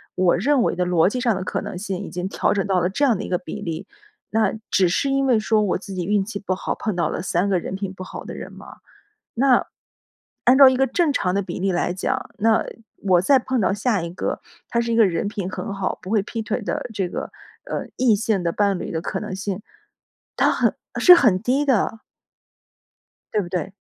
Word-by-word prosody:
我 185 -1 +3
认 270 +7 +2
为 - - 0
的 180 - 0
逻 175 0 +3
辑 250 - -3
上 240 -4 +1
的 185 - -3
可 - - -2
能 - - -6
性 190 -1 -4
已 - - -7
经 180 +1 -4
调 - - +1
整 200 -2 0
到 190 -2 +2
了 180 +1 +1
这 215 +10 -2
样 245 -7 +4
的 - - -5
一 - - -5
个 180 - +1
比 165 - -8
例， 165 +3 -4 0.4
那 215 -2 +1 0.2
只 185 -3 +4
是 230 +10 0
因 275 0 +1
为 250 -4 +4
说 215 0 +2
我 205 -3 +1
自 195 +1 -9
己 180 -2 -3
运 205 +1 +2
气 200 0 -6
不 190 -2 -2
好， - - -3
碰 215 -5 -3
到 175 - 0
了 - - -3
3 180 +2 0
个 185 - +2
人 185 - -5
品 195 -1 -4
不 185 - -8
好 185 - -8
的 - - -8
人 - - -8
吗？ - - -12 0.6
那， 255 +1 +3 0.8
按 250 +2 +6
照 275 -2 +10
一 260 - +2
个 270 +1 +3
正 325 0 +1
常 180 -8 0
的 200 - +2
比 175 -2 -6
例 195 0 +1
来 175 0 0
讲， 185 - -2
那， 220 +1 +3 0.4
我 185 -3 +4
再 270 +8 +5
碰 255 0 -1
到 190 - +2
下 205 -1 0
一 170 - -4
个， 180 - -3 0.3
他 235 - 0
是 235 0 -1
一 - - +1
个 225 -3 +6
人 170 +1 -1
品 200 -3 -4
很 200 - -5
好， 195 -1 -2
不 185 - -8
会 215 -2 +2
劈 225 +3 -5
腿 215 +3 -2
的 210 - -3
这 190 -3 -1
个， - - -5 0.3
呃， - - -4
异 250 -4 +4
性 205 -2 0
的 170 -1 0
伴 200 -1 +1
侣 - - -5
的 160 - -2
可 - - -3
能 - - -5
性， 195 0 -4 0.8
他 - - +3
很 - - +1 0.2
是 360 - +9
很 215 - +3
低 260 +6 +1
的。 225 -4 +1 1.3
对 210 - +2
不 175 - -7
对？ 180 +1 -3
200 Hz, 255 characters per minute, -22 LUFS, 185-230 Hz, 1.3 s, 照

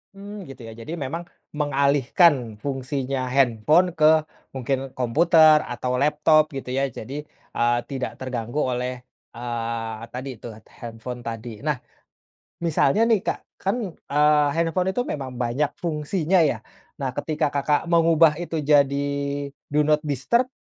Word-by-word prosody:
Mmm, 205 +1 -8
gitu 125 -3 -10
ya 115 - -8
jadi 115 +10 -7
memang 150 +3 -4 0.3
mengalihkan 140 - +2
fungsinya 135 0 -3
handphone 135 +7 +3
ke 155 -1 +4 0.3
mungkin 135 +1 -2
komputer 155 +4 +5
atau 125 +1 -3
laptop 150 +1 +4
gitu 135 -2 -6
ya 135 +1 0
jadi, 135 +5 -7 0.3
eee, 120 0 +2
tidak 135 -2 -5
terganggu 125 -1 -5
oleh, 125 -2 -2 0.3
eee, 115 -2 -4
tadi 130 +2 -6
tuh 115 -3 -8
t - - -24
handphone 120 +1 -7
tadi. 115 -1 -7
Nah, 150 -2 0 0.9
misalnya 165 +4 +3
nih 230 -2 +3
Kak - - 0 0.2
kan, 195 +3 0 0.2
eee, 150 -1 +2
handphone 175 +3 0
itu 245 - +1
memang 135 - -5
banyak 125 +4 -1
fungsinya 165 +3 +1
yah, 140 -8 +1 0.3
nah 135 -2 -3
ketika 150 +1 -1
Kakak 145 +1 +1
mengubah 165 -1 +4
itu 165 -3 -3
jadi 140 -1 +3 0.6
do 150 +1 +2
not 150 0 +3
disturb, 190 - +1
140 Hz, 135 wpm, -24 LUFS, 125-155 Hz, 0.9 s, komputer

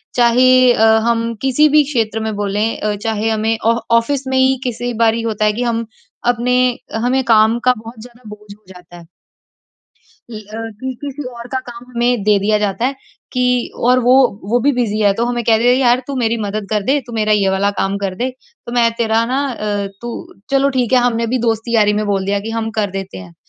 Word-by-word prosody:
चाहे 245 +1 +4 0.2
अ, 225 - +3 0.2
हम 230 0 0
किसी 270 +3 +3
भी 300 +1 +5
क्षेत्र 225 -6 -1
में 220 0 -2
बोलें, 205 +2 -1
अ, 210 -1 -1
चाहे 220 +1 -2
हमें 220 0 0
आ 230 - +4 0.2
ऑफ़िस 265 +3 -1
में 265 0 0
ही 265 0 +3
किसी 245 -1 -3
बारी 225 0 +2
होता 215 -2 -1
है 210 - +2
कि 240 +4 -3
हम 230 -1 -1 0.5
अपने 245 +1 0 0.5
हमें 260 +2 +1
काम 225 0 +4
का 255 - +5
बहुत 225 +1 -11
ज़्यादा 240 -1 -14
बोझ 210 -1 -11
हो 210 - -31
जाता 175 -1 -14
है। 170 - -13 1.3
ल - - -8
अ, 220 +2 -7
कि 260 0 -3
किसी 285 0 -6
और 235 0 -9
का 260 - 0
काम 240 0 -10
हमें 240 -1 +1
दे 210 -1 +4
दिया 210 +2 +1
जाता 210 +2 -2
है 275 - -2 0.4
कि 250 -1 0 0.2
और 250 +1 +5
वो 250 +1 +4 0.4
वो 245 +1 +2
भी 285 +4 +2
बिज़ी 225 -4 -1
है। 205 -2 +4
तो 230 - -1
हमें 240 0 -2
कह 225 0 +4
देते 235 +2 +2
हैं 250 - +5
यार 245 -1 +3
तू 280 - -5
मेरी 230 -2 0
मदद 205 0 -4
कर 210 -1 0
दे, 270 +8 +1
तू 240 - -10
मेरा 215 -1 +1
ये 200 -2 +2
वाला 195 +1 +1
काम 195 +1 -1
कर 195 -2 -3
दे। 245 +7 -2 0.4
तो 235 - -6
मैं 235 -1 +3
तेरा 225 0 +1
ना 260 +3 -1
अ, 210 -5 -3
तू 240 - -6 0.4
चलो 275 0 +3
ठीक 245 -2 0
है 255 - +6
हमने 230 -1 0
भी 255 - +1
दोस्ती 230 0 -1
यारी 210 -2 +4
में - - -2
बोल 195 -2 0
दिया 200 +1 0
कि 220 +3 -6
हम 225 0 -3
कर 205 -2 0
देते 195 - -6
हैं। 90 -2 -12
230 Hz, 225 wpm, -17 LUFS, 210-245 Hz, 1.3 s, है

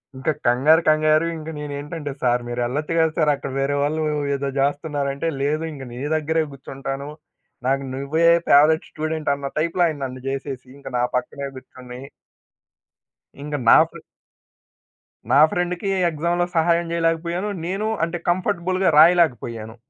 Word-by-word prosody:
ఇంకా 135 +4 -1 0.2
కంగారు 140 +7 +4
కంగారు, 155 +1 +3
ఇంకా 160 0 -7
నేనేంటంటే 145 +1 -5
సార్ 125 -1 +2
మీరెళ్లొచ్చు 125 +6 -2
గదా! 160 -1 +3
సార్. 155 -3 +3
అక్కడ 135 - -7
వేరే 140 +1 0
వాళ్ళు 155 +2 -1 0.3
ఏదో 140 0 -2
జేస్తున్నారంటే, 145 +1 -1
"లేదు 150 +3 0
ఇంగ 135 -3 -8
నీ 120 - -8 0.2
దగ్గరే 160 +1 0
గూర్చుంటాను. 135 +1 -6 0.6
నాకు 135 +1 +1
నువ్వే 150 +5 +1 0.2
ఫేవరైట్ 155 +3 +5
స్టూడెంట్" 155 -1 -2
అన్న 140 -1 -5
టైప్‌లో 170 +3 +1
ఆయన 155 -3 -4
నన్ను 130 0 -7
జేసేసి 135 -1 -5
ఇంక 140 - -13
నా 120 - +1
పక్కనే 140 +3 -4
గూర్చొని 125 -1 -11 1.4
ఇంకా 150 0 -3
నా - - +9
ఫ్రె - - -12 1.3
నా 135 - +6
ఫ్రెండ్‌కి 180 +2 -2 0.2
ఎక్సామ్‌లో 170 +2 0
సహాయం 170 +1 +3
చేయలేకపోయాను. 170 +3 -1 0.2
నేను 195 +4 -2 0.2
అంటే 170 +1 -4
కంఫర్టబుల్‌గా 185 0 +1
రాయలేకపోయాను. 120 -10 +3
150 Hz, 135 wpm, -22 LUFS, 135-165 Hz, 1.4 s, నా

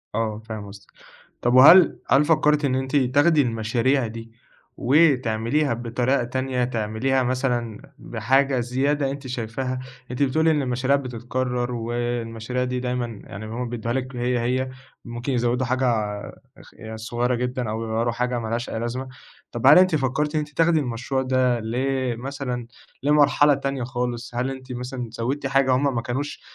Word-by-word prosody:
آه، 110 -1 -1
فاهم 110 -2 -6
قصدِك، 100 0 -14 0.5
طب 120 - +1
وهل 160 +8 +8
هل 140 +2 +5
فكرتِ 150 -2 +3
إن 130 -2 +1
أنتِ 130 +2 -2
تاخدي 145 +4 +4
المشاريع 120 +2 0
دي 115 +1 -9 0.5
وتعمليها 130 -1 +2
بطريقة 120 +2 0
تانية؟ 130 +1 -2
تعمليها 120 +3 0
مثلًا 125 -3 -1 0.2
بحاجة 130 +4 +1
زيادة 135 +3 0
أنتِ 140 -1 -7
شايفاها، 125 +1 -3 0.3
أنتِ 125 +3 0
بتقولي 160 +4 +2
إن 150 -2 +1
المشاريع 130 +1 +1
بتتكرر، 125 -1 -3
والمشاريع 120 0 -3
دي 125 0 -2
دايمًا 125 -3 -3
يعني 100 +2 -8
هُم 120 +3 -4
بيدّوها 115 0 -3
لِك 130 0 -3
هي، 125 0 0
هي 130 +2 -1 0.4
ممكن 120 +3 -4
يزودوا 120 +1 +1
حاجة 130 +2 0 0.7
اخ - - -16 0.2
صغيرة 120 +3 -1
جدًا، 125 -1 -2
أو 110 +1 -3
يغيّروا 115 +1 -1
حاجة 125 +1 -1
ملهاش 115 +1 -3
أي 110 - -3
لازمة، 120 +3 -4 0.4
طب 120 +2 0
هل 140 - +9
أنتِ 185 -2 +4
فكرتِ 150 +2 -1
إن - - +3
أنتِ 150 0 -4
تاخدي 165 -1 +4
المشروع 130 0 -2
ده 130 -2 +1
ل 110 +1 -4 0.4
مثلًا 125 -2 -5 0.4
لمرحلة 145 0 +4
تانية 140 -1 -2
خالص؟ 120 -1 -4
هل 125 +2 -1
أنتِ 130 -1 -9
مثلًا 125 -1 -5
زوّدتِ 135 +5 -2
حاجة 135 -1 +2
هُم 135 0 +1
ما 115 - 0
كانوش 130 +4 -4
125 Hz, 155 wpm, -23 LUFS, 120-135 Hz, 0.7 s, هل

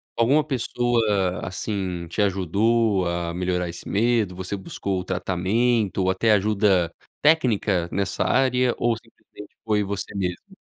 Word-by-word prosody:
alguma 135 +7 +3
pessoa 115 -8 0
assim 90 -2 -4
te 95 +5 -2
ajudou 100 +1 +1
a 85 -1 -2
melhorar 90 0 -1
esse 85 0 -8
medo, 110 -3 +1
você 95 +2 -4
buscou 95 0 -4
o - - -4
tratamento 95 +4 0
ou 95 - +2
até 110 +3 +2
ajuda 100 -4 +2 0.3
técnica 110 - +2
nessa 100 0 -1
área 125 -2 +2
ou 120 -1 +1
simplesmente 115 -2 -15
foi 105 -2 +1
você 100 0 -4
mesmo? 95 - -4
100 Hz, 135 wpm, -24 LUFS, 90-115 Hz, 0.3 s, alguma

